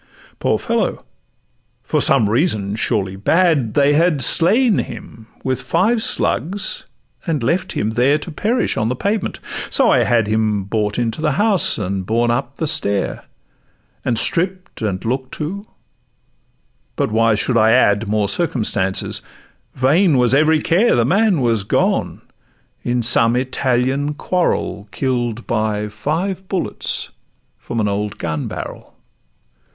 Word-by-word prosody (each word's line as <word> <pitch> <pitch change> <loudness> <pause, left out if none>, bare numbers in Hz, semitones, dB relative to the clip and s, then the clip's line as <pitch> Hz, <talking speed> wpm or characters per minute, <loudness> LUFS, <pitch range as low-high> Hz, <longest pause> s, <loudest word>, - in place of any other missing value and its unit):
Poor - - +1
fellow! - - -2 0.8
for - - 0
some 130 -6 +4
reason, 105 - +1
surely 100 -4 -1
bad, 145 - +1
They 145 0 +4
had 160 0 +2
slain 200 - +3
him 110 -1 -8 0.2
with 130 -1 -1
five 225 +4 +1
slugs; 195 -1 0 0.4
and 155 -6 -1
left 180 +9 0
him 110 - -1
there 125 +6 +2
To 155 +3 -7
perish 225 +10 -1
on 110 +1 0
the 125 - -1
pavement: 200 - -2 0.3
so - - +3
I - - +4
had 115 -3 +2
Him 105 -1 0
borne 105 +1 -1
into 120 +3 -2
the 150 -3 +1
house 205 +3 +2
and 95 -2 -3
up 120 +3 0
the 160 - -2
stair, 140 -11 -1 0.8
And 120 -3 0
stripp'd 185 - -1
and 100 -3 -3
look'd 130 +2 -2 1.6
to—But - - -1
why 115 0 +3
should 120 +3 -1
I 110 0 +4
ad 105 -1 +3
More 105 0 0
circumstances? 105 - -1 0.5
vain 145 +5 +3
was 125 0 +3
every 155 +2 +3
care; 200 +8 +3
The 120 - +2
man 195 - +2
was 115 -4 +1
gone: - - 0 0.6
in 120 0 -1
some 115 +1 +3
Italian 130 +2 0
quarrel 160 - -1
Kill'd 120 +1 -2
by 110 -2 -1
five 175 - -3
bullets 190 -3 -2 0.5
from 115 - -5
an 105 - +1
old 100 +1 -3
gun 80 -3 -3
barrel. - - -8
125 Hz, 135 wpm, -18 LUFS, 110-160 Hz, 1.6 s, some